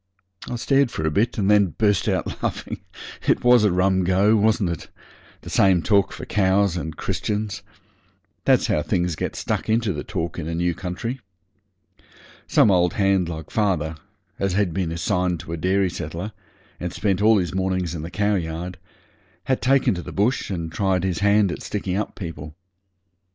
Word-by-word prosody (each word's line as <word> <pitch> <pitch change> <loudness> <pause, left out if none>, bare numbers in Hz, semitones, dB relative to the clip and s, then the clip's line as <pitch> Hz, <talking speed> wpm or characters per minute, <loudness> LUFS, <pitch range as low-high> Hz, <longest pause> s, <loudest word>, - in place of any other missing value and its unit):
I - - -3
stared 135 +2 +2
for 80 -8 -4
a 80 - +1
bit, 115 +11 +1
and 100 -3 +1
then 100 -5 +4
burst 105 -3 +2
out - - -2
laughing. - - -3 0.5
It - - +2
was 125 -2 +6
a 105 - +4
rum 95 +1 +2
go, 95 +4 +3
wasn't 105 -3 +2
it? 85 - -6 0.5
The - - -9
same 95 -4 +4
talk 100 -2 +3
for - - -7
cows 95 -2 +2
and 80 -3 -5
Christians. 105 -1 -2 0.8
That's - - +4
how 75 - +1
things 90 0 0
get - - -4
stuck - - -3
into 110 -2 +2
the 75 - -5
talk 85 +1 -4
in 80 - -5
a 85 - -3
new 85 +1 +1
country. 95 +9 -4 1.3
Some 105 - +4
old 90 -2 +3
hand 95 -3 +2
like 80 -2 -7
father, 90 -7 0 0.4
as 95 -2 0
had 95 -3 +1
been 90 -2 -1
assigned 90 +1 0
to 80 - -7
a - - -3
dairy 95 +2 +1
settler, 85 +5 -5 0.5
and 90 -1 -3
spent 100 0 0
all 110 +1 +5
his 90 -3 -1
mornings 95 -3 -1
in 80 - -5
the 80 - -6
cowyard, 90 -2 -2 0.6
had 130 - 0
taken 135 -2 +3
to 90 - -4
the - - -8
bush 110 +6 0
and 85 -4 -4
tried 95 0 0
his 90 -3 -1
hand 100 -1 +3
at - - -6
sticking 95 -3 -3
up 105 - -3
people. 80 -4 -7
95 Hz, 180 wpm, -23 LUFS, 85-105 Hz, 1.3 s, was